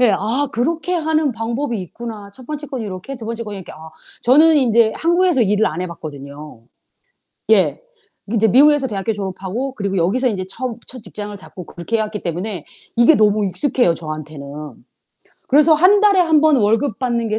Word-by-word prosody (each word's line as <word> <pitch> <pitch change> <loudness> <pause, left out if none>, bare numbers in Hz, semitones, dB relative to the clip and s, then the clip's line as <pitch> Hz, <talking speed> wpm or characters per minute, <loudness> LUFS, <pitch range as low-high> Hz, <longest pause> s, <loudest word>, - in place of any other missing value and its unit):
예. 245 -3 +5
아 240 +8 0
그렇게 320 +9 -1
하는 315 -4 0
방법이 230 +1 -3
있구나. 210 +2 -8
첫 255 +4 -14
번째 300 +1 -6
거는 260 -5 -5
요렇게 190 +8 -7
2 235 - -9
번째 230 0 -4
거는 210 -3 -7
이렇게 185 - -10
아. 160 +1 -12 0.3
저는 310 +6 +5
인제 235 -5 +3
한국에서 345 -4 +2
일을 210 +1 +2
안 155 +3 -3
해 185 - -2
봤거든요. 145 -5 -10 0.9
예. 210 -4 +3 0.5
인제 220 0 +2
미국에서 285 +4 +5
대학교 205 -2 -2
졸업하고 200 +6 -5
그리고 200 -4 -3
여기서 200 +10 +1
인제 190 -5 -3
처음 250 +3 -4
첫 255 -2 -8
직장을 205 0 -7
잡고 185 -2 -11
그렇게 175 +7 -3
해 - - -1
왔기 210 -1 -5
때문에 180 +1 -4 0.3
이게 240 +7 +6
너무 210 -3 +3
익숙해요, 190 - +1
저한테는. 155 -3 -7 1.0
그래서 300 +3 +5
1 370 +6 +5
달에 405 -3 +4
1 320 -3 +4
번 310 -2 +4
월급 225 +2 +1
받는 235 -2 -1
게 215 +1 -1
225 Hz, 370 characters per minute, -19 LUFS, 190-275 Hz, 1.0 s, 이게